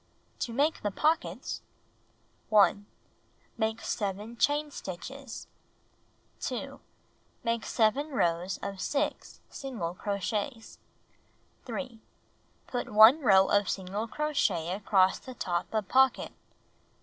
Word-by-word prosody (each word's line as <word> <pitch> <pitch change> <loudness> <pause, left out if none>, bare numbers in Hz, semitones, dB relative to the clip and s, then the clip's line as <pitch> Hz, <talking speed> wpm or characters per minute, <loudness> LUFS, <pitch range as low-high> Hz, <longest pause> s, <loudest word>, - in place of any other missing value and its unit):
To 235 - -2
Make 290 +7 +1
the 205 - 0
Pockets 310 - -1 0.9
1. 205 -1 +4 0.7
Make 220 -1 -1
7 205 +3 -3
chain 295 +4 +1
stitches. 265 +8 -7 0.9
2. - - -4 0.6
Make 230 -1 0
7 240 +7 +1
rows 175 - 0
of 195 -1 -5
6 290 0 -2
single 225 -12 -4
crochets. 205 +5 -3 0.9
3. 250 -5 -6 0.6
Put 245 - -4
1 220 +7 +8
row 195 -6 +6
of 205 -1 +3
single 195 +4 -3
crochet 215 - 0
across 190 -1 +3
the 255 -1 -10
top 175 -5 -2
of 215 -3 -1
pocket. 265 -1 +3
220 Hz, 100 wpm, -29 LUFS, 195-265 Hz, 0.9 s, 1